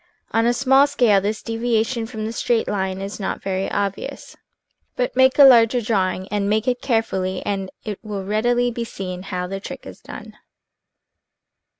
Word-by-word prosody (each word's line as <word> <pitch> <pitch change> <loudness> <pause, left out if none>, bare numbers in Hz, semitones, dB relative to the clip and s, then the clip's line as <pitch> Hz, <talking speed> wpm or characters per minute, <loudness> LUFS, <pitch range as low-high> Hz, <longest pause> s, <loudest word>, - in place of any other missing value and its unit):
On 225 +1 +2
a - - +4
small 270 +3 +4
scale 240 -8 +3
this 210 +2 -3
deviation 230 0 -1
from 220 -2 -5
the 220 - -3
straight 235 -1 0
line 190 -1 -2
is 195 +2 -6
not 190 - -4
very 190 0 -2
obvious, 200 -1 -4 0.6
but 250 -1 -2
make 260 0 +4
a 285 - +9
larger 245 -2 +7
draw 205 -5 +1
ing, 185 +1 -7
and 205 -1 -1
make 215 +3 0
it 245 -1 0
carefully, 190 -6 -1
and 195 -2 -2 0.2
it 210 -3 -5
will 205 -3 -5
readily 240 +4 +1
be 235 0 -4
seen 185 -5 -6
how 185 -1 -4
the 195 +2 -5
trick - - -9
is - - -10
done. - - -10
215 Hz, 180 wpm, -21 LUFS, 195-240 Hz, 0.6 s, a